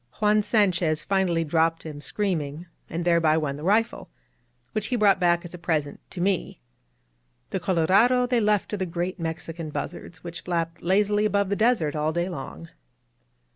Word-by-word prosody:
Juan 210 0 +4
Sanchez 180 -7 +2
finally 190 -4 +1
dropped 165 +1 +1
him, 150 -2 -7
screaming, 160 -2 -2 0.2
and 170 +1 -3
thereby 165 -2 +4
won 150 -3 -1
the 145 - -9
rifle, 220 +5 +1 0.6
which 215 0 -2
he 255 - -1
brought 205 -4 +4
back 175 -1 +2
as 175 - -9
a 180 - -8
present 150 -4 -1
to - - -8
me. 185 - -1 0.9
The - - -1
Colorado 195 +9 +3
they 245 -1 +1
left 210 -2 +2
to 210 - -3
the 190 -2 -2
great 175 +2 -3
Mexican 160 0 -5
buzzards, 160 +2 -6
which 170 -1 -7
flap 170 -1 -2
lazily 205 +3 +2
above 200 -2 +1
the 200 - +1
desert 215 -10 +2
all 155 +1 0
day 175 +2 -1
long. 85 - -7
175 Hz, 170 wpm, -25 LUFS, 160-200 Hz, 0.9 s, Juan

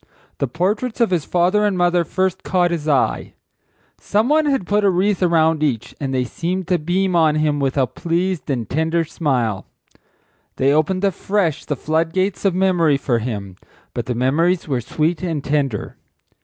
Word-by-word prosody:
The 140 - 0
portraits 210 - -2
of 230 -4 +2
his 170 -5 0
father 180 +4 +2
and 205 -3 +1
mother 175 -1 +2
first 185 +2 -1
caught 180 -2 +1
his 160 -3 -3
eye. 140 -3 0 0.6
Some 215 +5 0
one 310 0 +3
had 270 -10 0
put 205 +3 +1
a 200 - +5
wreath 190 +2 +1
around 160 -3 +3
each 125 -6 -1
and 135 -2 -3
they 130 -1 0
seemed 175 +8 -3
to 180 -2 +2
beam 180 +4 0
on 160 -3 +4
him 155 -1 +1
with 135 0 -1
a 135 - +4
pleased 175 +3 -2
and 120 -6 -2
tender 160 +5 0
smile. 125 - -1 0.9
They 135 +2 +2
opened 185 +5 +1
afresh 195 -3 0
the 145 - -2
flood 160 +4 -1
gates 190 +2 -1
of 190 -3 +2
memory 175 -6 +3
for 125 -4 0
him, 100 -5 -5 0.4
but - - -4
the 125 - -2
memories 165 +9 +1
were 130 -4 -1
sweet 155 +8 -1
and 165 -6 -3
tender. 140 -7 -2
165 Hz, 180 wpm, -20 LUFS, 140-185 Hz, 0.9 s, a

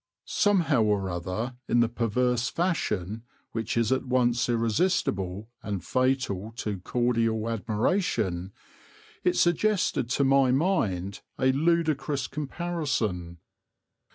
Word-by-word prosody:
Somehow 175 - +2
or 100 -3 +1
other, 90 +9 -4
in 120 - +3
the 120 - +4
perverse 120 +1 0
fashion 110 - -1 0.3
which 115 0 -2
is 115 0 +2
at 130 - +2
once 125 -2 +1
irresistible 115 - 0
and 100 -3 -4
fatal 130 -5 0
to 105 -5 -3
cordial 115 +1 0
admiration, 110 - 0 0.7
it 180 0 +2
suggested 180 - +2
to 140 - +2
my 135 -1 +4
mind 105 - 0 0.2
a 130 0 +3
ludicrous 150 -2 +1
comparison. 135 - -3
120 Hz, 105 wpm, -27 LUFS, 105-140 Hz, 0.7 s, the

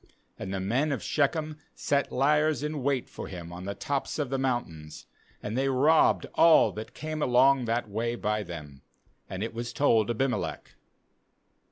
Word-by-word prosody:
25And 95 - -5
the 95 - -2
men 125 +11 0
of 140 - -3
Shechem 155 +1 0 0.2
set 140 -1 0
liers 150 +1 +2
in 150 -1 -3
wait 135 -1 0
for - - -8
him 85 -2 -8
on 90 +1 -8
the 100 0 -4
tops 145 -3 -3
of 145 -4 -2
the 135 - 0
mountains, 85 -13 -3 0.4
and 105 - -4
they 135 +2 +1
robbed 145 +5 +3
all 165 -1 +6
that 110 +1 -8
came 155 0 -5
along 130 0 +4
that 115 0 -1
way 115 +3 -2
by 105 -2 -1
them; 75 -7 -9 0.5
and 95 +2 -4
it 115 - -4
was 120 +1 -5
told 115 -7 +2
Abimelech. 125 +2 -2
125 Hz, 170 wpm, -28 LUFS, 105-145 Hz, 0.5 s, all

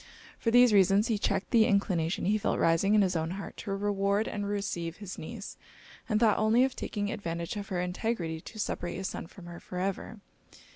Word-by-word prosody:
For 230 - 0
these 245 -1 +6
reasons 200 +3 +4
he 220 -3 +1
checked 195 - -1
the 225 -2 +5
inclination 185 -5 +1
he 210 +3 +2
felt - - 0
rising 165 +5 +3
in 210 - +5
his 185 -1 0
own 160 0 -1
heart 200 - -7
to 195 - -3
reward 200 +1 0
and 205 -1 -3
receive 185 -5 -3
his 200 -3 -8
niece, 200 +5 -7 0.5
and 215 -2 +2
thought 220 -3 +4
only 220 +3 +4
of 265 -1 0
taking 205 -1 -3
advantage 170 -3 -4
of 205 -1 -5
her 180 - -2
integrity 180 -3 -2
to 220 - -11
separate 175 -4 -3
his 190 +2 -3
son - - -6
from 180 0 -13
her 170 0 -9
for 180 - -8
ever. 195 +3 -3
200 Hz, 205 wpm, -29 LUFS, 180-215 Hz, 0.5 s, these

